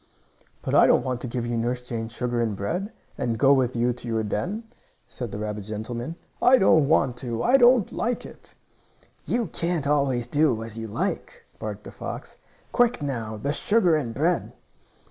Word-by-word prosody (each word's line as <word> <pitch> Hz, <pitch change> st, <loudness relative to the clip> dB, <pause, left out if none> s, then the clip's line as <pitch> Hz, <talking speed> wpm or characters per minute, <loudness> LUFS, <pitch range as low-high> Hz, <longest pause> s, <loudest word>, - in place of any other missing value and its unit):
"But -, -, -3 dB
I -, -, +7 dB
don't -, -, +4 dB
want 125 Hz, -2 st, -2 dB
to -, -, -4 dB
give 120 Hz, 0 st, -3 dB
you 120 Hz, 0 st, -2 dB
Nurse 125 Hz, +1 st, -2 dB
Jane's 115 Hz, -1 st, -4 dB
sugar 120 Hz, 0 st, -1 dB
and 110 Hz, -3 st, 0 dB
bread, 180 Hz, -, -3 dB, 0.3 s
and 115 Hz, -2 st, -1 dB
go 135 Hz, +3 st, +5 dB
with 130 Hz, -2 st, +1 dB
you 120 Hz, +1 st, +2 dB
to 125 Hz, 0 st, -9 dB
your 110 Hz, -1 st, 0 dB
den," 180 Hz, -, -2 dB, 0.4 s
said 120 Hz, -4 st, -6 dB
the -, -, -5 dB
rabbit 105 Hz, 0 st, -4 dB
gentleman. 115 Hz, +7 st, -5 dB, 0.3 s
"I 260 Hz, +1 st, +7 dB
don't 160 Hz, -, +5 dB
want 135 Hz, -5 st, +2 dB
to! 120 Hz, -3 st, -3 dB
I 260 Hz, +3 st, +5 dB
don't 245 Hz, -4 st, +5 dB
like 240 Hz, +1 st, -2 dB
it!" -, -, -12 dB, 0.7 s
"You 235 Hz, -1 st, +1 dB
can't 170 Hz, -3 st, -2 dB
always 140 Hz, -4 st, +1 dB
do 130 Hz, -4 st, +1 dB
as 115 Hz, -1 st, -8 dB
you 115 Hz, 0 st, -5 dB
like," 195 Hz, -, -3 dB, 0.2 s
barked -, -, -5 dB
the -, -, -9 dB
fox. -, -, -7 dB, 0.3 s
"Quick 245 Hz, -, +2 dB
now 115 Hz, -6 st, -3 dB
the 140 Hz, +7 st, -2 dB
sugar 190 Hz, -2 st, +3 dB
and 135 Hz, -7 st, -1 dB
bread!" 165 Hz, +5 st, 0 dB
125 Hz, 185 wpm, -25 LUFS, 115-170 Hz, 0.7 s, I